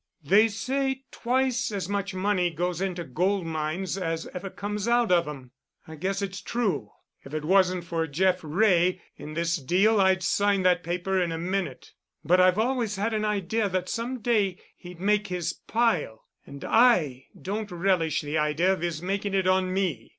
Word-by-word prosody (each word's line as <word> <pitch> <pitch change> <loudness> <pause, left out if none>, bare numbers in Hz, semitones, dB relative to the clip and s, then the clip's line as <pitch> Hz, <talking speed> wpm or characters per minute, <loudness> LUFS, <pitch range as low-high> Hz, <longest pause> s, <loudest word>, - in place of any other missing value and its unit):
They 200 +9 +5
say 265 +5 -2
twice 250 -1 0
as 195 -4 -3
much 200 -1 -3
money 185 -2 +1
goes 175 +2 -3
into 180 -3 -2
gold 180 +7 0
mines 165 +4 -3
as 165 -2 -3
ever 185 +1 -5
comes 205 +3 -4
out 240 -3 +3
of 170 -2 +3
'em. 135 -4 -8 0.4
I 160 - -9
guess 195 +5 -2
it's 195 0 -5
true. 200 - -2 0.3
If 140 +3 -8
it 155 -1 -3
wasn't 185 0 +3
for 165 -1 -2
Jeff 180 +5 +1
Wray 180 +2 +2 0.2
in 155 +1 -8
this 170 +1 0
deal 195 +9 +3
I'd 190 0 +3
sign 200 0 +2
that 180 -1 +3
paper 180 +2 -1
in 170 -2 -1
a 165 - -3
minute. 175 -6 -3 0.3
But 180 +4 +5
I've 185 +1 +4
always 230 -2 0
had 210 +4 -1
an 215 0 0
idea 210 +1 0
that 185 0 -2
some 240 +2 -3
day 205 -5 +1 0.2
he'd 175 -1 -12
make 210 +2 +1
his 175 -3 -2
pile, 195 - -1 0.2
and 140 0 -9
I 180 - +3
don't 210 +2 -4
relish 175 -3 +1
the 150 +1 -2
idea 155 +5 +2
of 185 - -5
his 170 -2 -3
making 195 +1 -2
it 190 -1 +1
on 185 0 +2
me. 180 - -2
185 Hz, 180 wpm, -26 LUFS, 170-205 Hz, 0.4 s, They